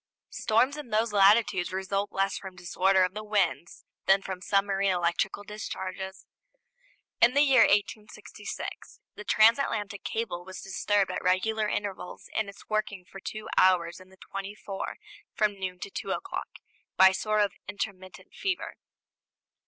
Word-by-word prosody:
Storms 255 Hz, +7 st, +2 dB
in 295 Hz, -5 st, -8 dB
those 215 Hz, 0 st, +1 dB
latitudes 200 Hz, -2 st, +4 dB
result 195 Hz, +2 st, -2 dB
less 195 Hz, 0 st, 0 dB
from 190 Hz, -1 st, -7 dB
disorder 185 Hz, +1 st, +2 dB
of 185 Hz, 0 st, 0 dB
the 215 Hz, +1 st, -5 dB
winds 185 Hz, -8 st, -1 dB, 0.2 s
than 195 Hz, 0 st, +5 dB
from 185 Hz, -1 st, -5 dB
submarine 195 Hz, 0 st, +1 dB
electrical 180 Hz, +2 st, 0 dB
discharges. 190 Hz, -2 st, -6 dB, 1.0 s
In 240 Hz, +3 st, +6 dB
the 285 Hz, -, +6 dB
year 270 Hz, -3 st, +6 dB
1866 210 Hz, +1 st, -2 dB
the 210 Hz, -, -9 dB
transatlantic 215 Hz, -3 st, +3 dB
cable 220 Hz, -6 st, -3 dB
was 185 Hz, +1 st, -9 dB
disturbed 200 Hz, 0 st, +1 dB
at -, -, -3 dB
regular 210 Hz, +4 st, +1 dB
intervals 200 Hz, -3 st, -5 dB
in 215 Hz, -2 st, 0 dB
its 200 Hz, -, -14 dB
working 210 Hz, -3 st, -2 dB
for 195 Hz, -, -11 dB
two 215 Hz, +2 st, -6 dB
hours 175 Hz, -2 st, +3 dB
in 185 Hz, 0 st, -16 dB
the 190 Hz, -, -19 dB
twenty 195 Hz, +2 st, -7 dB
four 195 Hz, -3 st, -6 dB, 0.4 s
from 205 Hz, -2 st, +1 dB
noon 185 Hz, -1 st, -4 dB
to 200 Hz, -, -6 dB
two 195 Hz, -, -5 dB
o'clock 385 Hz, -, -3 dB, 0.5 s
by 190 Hz, 0 st, +9 dB
a -, -, -2 dB
sort 215 Hz, +2 st, +1 dB
of 205 Hz, -2 st, +2 dB, 0.2 s
intermittent 190 Hz, -1 st, -6 dB
fever. 385 Hz, -1 st, -3 dB
195 Hz, 150 wpm, -28 LUFS, 190-215 Hz, 1.0 s, by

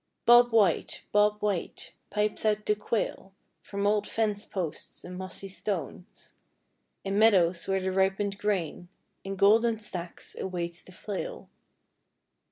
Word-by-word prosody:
Bob 240 Hz, 0 st, +7 dB
White, 205 Hz, -7 st, +2 dB
Bob 210 Hz, 0 st, +3 dB
White, 180 Hz, -4 st, -3 dB, 0.2 s
pipes 210 Hz, 0 st, -1 dB
out 215 Hz, -1 st, +1 dB
the 210 Hz, -, +3 dB
quail 205 Hz, -2 st, -3 dB, 0.3 s
From 200 Hz, 0 st, -4 dB
old 210 Hz, 0 st, +2 dB
fence 215 Hz, -2 st, -1 dB
posts 175 Hz, -6 st, -5 dB
and 180 Hz, -, -8 dB
mossy 185 Hz, +1 st, -5 dB
stones, 190 Hz, -2 st, -6 dB, 0.7 s
In 195 Hz, +1 st, 0 dB
meadows 185 Hz, -6 st, +4 dB
where 195 Hz, 0 st, +1 dB
the 190 Hz, 0 st, -1 dB
ripened 195 Hz, +1 st, 0 dB
grain 180 Hz, -4 st, -2 dB, 0.3 s
In 195 Hz, 0 st, -4 dB
golden 220 Hz, +4 st, +4 dB
stacks 180 Hz, -5 st, -7 dB
awaits 175 Hz, -2 st, -4 dB
the -, -, -15 dB
flail. 210 Hz, -, -6 dB
200 Hz, 130 wpm, -28 LUFS, 185-210 Hz, 0.7 s, Bob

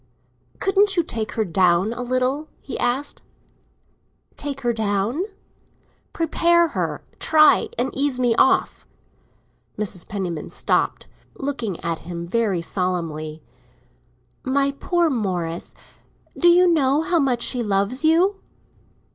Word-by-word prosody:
"Couldn't 390 Hz, 0 st, +2 dB
you 345 Hz, -, +4 dB
take 225 Hz, -8 st, -4 dB
her 220 Hz, -2 st, 0 dB
down 185 Hz, +3 st, +2 dB
a 245 Hz, -, -6 dB
little?" 255 Hz, +4 st, -1 dB
he 275 Hz, -, -7 dB
asked. 265 Hz, +4 st, -1 dB, 1.1 s
"Take 280 Hz, -1 st, -5 dB
her 240 Hz, -2 st, 0 dB
down?" 220 Hz, -, -1 dB, 0.9 s
"Prepare 340 Hz, +1 st, +2 dB
her—try 315 Hz, +9 st, +2 dB
and 260 Hz, -, -1 dB
ease 275 Hz, -2 st, +1 dB
me 245 Hz, -2 st, +3 dB
off." 265 Hz, -, +2 dB, 0.9 s
Mrs. 190 Hz, -4 st, -3 dB
Penniman 180 Hz, -6 st, -4 dB
stopped, -, -, 0 dB, 0.3 s
looking 245 Hz, -10 st, -3 dB
at 165 Hz, -1 st, -2 dB
him 170 Hz, 0 st, -6 dB
very 195 Hz, -4 st, 0 dB
solemnly. 165 Hz, -4 st, -3 dB, 1.0 s
"My 275 Hz, +1 st, +1 dB
poor 345 Hz, +4 st, 0 dB
Morris, 180 Hz, -8 st, -3 dB, 0.6 s
do 350 Hz, -, +2 dB
you 355 Hz, +1 st, +6 dB
know 300 Hz, -3 st, +2 dB
how 345 Hz, 0 st, +1 dB
much 250 Hz, -5 st, +1 dB
she 250 Hz, -, -1 dB
loves 205 Hz, +5 st, 0 dB
you?" 350 Hz, +6 st, +3 dB
245 Hz, 115 wpm, -22 LUFS, 195-305 Hz, 1.1 s, you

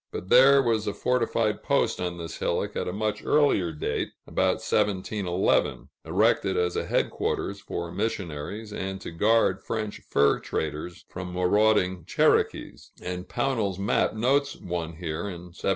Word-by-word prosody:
But 90 Hz, -, -6 dB
there 135 Hz, +2 st, +7 dB
was 115 Hz, -3 st, 0 dB
a 100 Hz, -, -2 dB
fortified 115 Hz, -3 st, 0 dB
post -, -, +1 dB
on 90 Hz, -1 st, -3 dB
this 85 Hz, -1 st, -6 dB
hillock -, -, -1 dB
at -, -, -2 dB
a -, -, -1 dB
much 105 Hz, +2 st, -2 dB
earlier 140 Hz, -, +3 dB
date 75 Hz, -, -3 dB
(about -, -, +1 dB
1711), 95 Hz, -2 st, 0 dB
erected 95 Hz, -, +2 dB
as 90 Hz, 0 st, 0 dB
a -, -, -2 dB
headquarters 100 Hz, 0 st, -1 dB
for 85 Hz, -2 st, -5 dB
missionaries, 100 Hz, 0 st, -4 dB
and 95 Hz, -1 st, -4 dB
to -, -, -7 dB
guard 100 Hz, +1 st, +2 dB
French 110 Hz, -2 st, -4 dB
fur 70 Hz, 0 st, +3 dB
traders 80 Hz, +3 st, -4 dB
from 90 Hz, 0 st, -7 dB
marauding 90 Hz, -1 st, +2 dB
Cherokees; -, -, +1 dB
and 90 Hz, +1 st, -5 dB
Pownall's 115 Hz, -7 st, -1 dB
map 100 Hz, +2 st, +1 dB
notes 135 Hz, +6 st, +1 dB
one 85 Hz, -2 st, -4 dB
here 85 Hz, +1 st, -4 dB
in 90 Hz, -1 st, -8 dB
1751. -, -, -19 dB
95 Hz, 150 wpm, -26 LUFS, 90-110 Hz, -, there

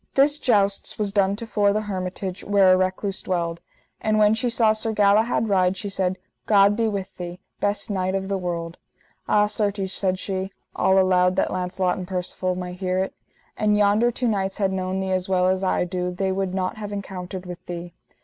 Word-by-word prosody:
This 290 Hz, +2 st, +4 dB
jousts 200 Hz, -7 st, +1 dB
was 210 Hz, -2 st, -1 dB
done 200 Hz, -1 st, +2 dB
to 230 Hz, -, -6 dB
fore 205 Hz, -3 st, +2 dB
the 215 Hz, -, 0 dB
hermitage 185 Hz, -1 st, -4 dB
where 195 Hz, -2 st, +5 dB
a -, -, +6 dB
recluse 185 Hz, +1 st, -1 dB
dwelled. 170 Hz, -2 st, -2 dB, 0.4 s
And 215 Hz, -1 st, +1 dB
when 210 Hz, 0 st, +5 dB
she 225 Hz, +2 st, 0 dB
saw 225 Hz, -2 st, +3 dB
Sir 220 Hz, +1 st, -3 dB
Galahad 215 Hz, +2 st, +3 dB
ride, 190 Hz, -2 st, +2 dB
she 205 Hz, -, -4 dB
said: 190 Hz, -1 st, -1 dB, 0.3 s
God 200 Hz, -1 st, +5 dB
be 225 Hz, 0 st, +1 dB
with 200 Hz, -3 st, -4 dB
thee, 175 Hz, 0 st, -6 dB, 0.2 s
best 205 Hz, +1 st, -1 dB
knight 185 Hz, -1 st, 0 dB
of 190 Hz, 0 st, -2 dB
the 195 Hz, -1 st, -1 dB
world. 170 Hz, -2 st, -4 dB, 0.5 s
Ah 210 Hz, 0 st, +4 dB
certes, 205 Hz, -2 st, -1 dB
said 185 Hz, -1 st, 0 dB
she, 190 Hz, 0 st, -3 dB, 0.2 s
all 190 Hz, 0 st, +3 dB
aloud 185 Hz, -1 st, +4 dB
that 190 Hz, -, +1 dB
Launcelot 180 Hz, 0 st, -1 dB
and 180 Hz, -, -6 dB
Percivale 185 Hz, 0 st, -2 dB
might 180 Hz, 0 st, -6 dB
hear 185 Hz, -1 st, -1 dB
it: 190 Hz, +1 st, -1 dB, 0.4 s
An 210 Hz, -1 st, +2 dB
yonder 210 Hz, +3 st, +4 dB
two 245 Hz, +1 st, -2 dB
knights 195 Hz, -3 st, 0 dB
had 195 Hz, -2 st, +1 dB
known 185 Hz, 0 st, -2 dB
thee 190 Hz, 0 st, -2 dB
as 185 Hz, 0 st, -1 dB
well 185 Hz, -1 st, +3 dB
as 185 Hz, +1 st, +1 dB
I 185 Hz, -, +1 dB
do 180 Hz, 0 st, -2 dB
they 190 Hz, +2 st, -1 dB
would 190 Hz, -1 st, -2 dB
not 185 Hz, +2 st, -2 dB
have 205 Hz, -1 st, -6 dB
encountered 190 Hz, -2 st, -6 dB
with 180 Hz, -1 st, -8 dB
thee. 175 Hz, 0 st, -6 dB
190 Hz, 205 wpm, -23 LUFS, 185-205 Hz, 0.5 s, a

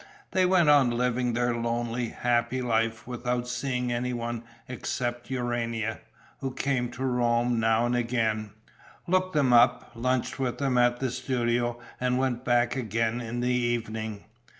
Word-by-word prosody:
They 185 Hz, -1 st, +3 dB
went 180 Hz, -3 st, +4 dB
on 145 Hz, -4 st, +6 dB
living 125 Hz, 0 st, 0 dB
their 120 Hz, +1 st, +1 dB
lonely, 120 Hz, 0 st, -2 dB
happy 120 Hz, +1 st, 0 dB
life, 115 Hz, -2 st, 0 dB
without 125 Hz, 0 st, -2 dB
seeing 125 Hz, 0 st, -2 dB
any 125 Hz, +1 st, -1 dB
one 120 Hz, -1 st, -3 dB, 0.3 s
except 120 Hz, -1 st, -3 dB
Urania, 115 Hz, -3 st, -2 dB, 0.4 s
who 135 Hz, -1 st, -4 dB
came 130 Hz, -3 st, 0 dB
to 130 Hz, -, -5 dB
Rome 120 Hz, -1 st, +1 dB
now 115 Hz, +1 st, +3 dB
and 120 Hz, 0 st, +1 dB
again, 115 Hz, -3 st, 0 dB, 0.6 s
looked 185 Hz, +1 st, +1 dB
them 135 Hz, -4 st, +3 dB
up, 120 Hz, +1 st, +4 dB
lunched 125 Hz, +2 st, -1 dB
with 130 Hz, -2 st, -1 dB
them 135 Hz, -3 st, 0 dB
at 120 Hz, 0 st, +3 dB
the 130 Hz, -2 st, -1 dB
studio 120 Hz, -2 st, -1 dB, 0.2 s
and 125 Hz, 0 st, +1 dB
went 130 Hz, -2 st, 0 dB
back 120 Hz, 0 st, +2 dB
again 115 Hz, -1 st, -1 dB
in 120 Hz, +1 st, -4 dB
the 125 Hz, -, +1 dB
evening. 110 Hz, -3 st, -2 dB
120 Hz, 150 wpm, -27 LUFS, 120-125 Hz, 0.6 s, on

